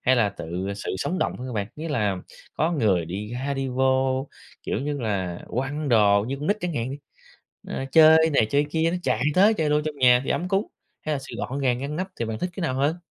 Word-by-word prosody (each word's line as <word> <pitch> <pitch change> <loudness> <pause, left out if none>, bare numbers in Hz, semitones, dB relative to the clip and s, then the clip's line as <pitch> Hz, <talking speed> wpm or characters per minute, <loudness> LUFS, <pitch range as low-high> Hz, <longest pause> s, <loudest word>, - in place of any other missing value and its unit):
hay 130 0 +3
là 110 -4 +3
tự 95 +1 -5
sự 100 - -4
sống 185 - -2
động - - -1
hơn 125 - -6
hả 125 - -6
bạn? 105 -3 -2
Nghĩa 160 +2 -5
là 105 -10 0 0.4
có 160 +3 +1
người 105 - +2
đi 105 +5 -5
ra 135 +3 -2
đi 135 -1 -2
vô, 130 +1 +1 0.3
kiểu - - -2
như 145 +1 -2
là, 95 -6 -2
quăng 140 +4 -2
đồ 105 -3 +4
như 135 - -2
con 145 +2 -5
nít 205 +2 +2
chẳng 175 -3 -3
hạn 120 0 -2
đi, 140 - -6 0.7
ờ, 135 - -3
chơi 160 0 +7
này 135 -7 +3
chơi 145 +1 +2
kia 165 0 +1
nó 175 - -1
chạy 115 - 0
tới 205 +4 +5
chơi 155 -7 0
đô 150 - +3
trong 155 -1 -4
nhà 125 -1 +6
thì - - -4
ấm 180 - -1
cúng, 195 +3 +1 0.4
hay 155 - -1
là - - -2
sự 135 - -9
gọn 135 - -3
gàng 125 -2 +1
ngăn 140 +3 -4
nắp, 185 +3 -2
thì 115 - -2
bạn 110 -1 -4
thích 180 - -2
cái 190 - -4
nào 145 -6 0
hơn? 145 +5 +1
135 Hz, 255 wpm, -24 LUFS, 115-155 Hz, 0.7 s, chơi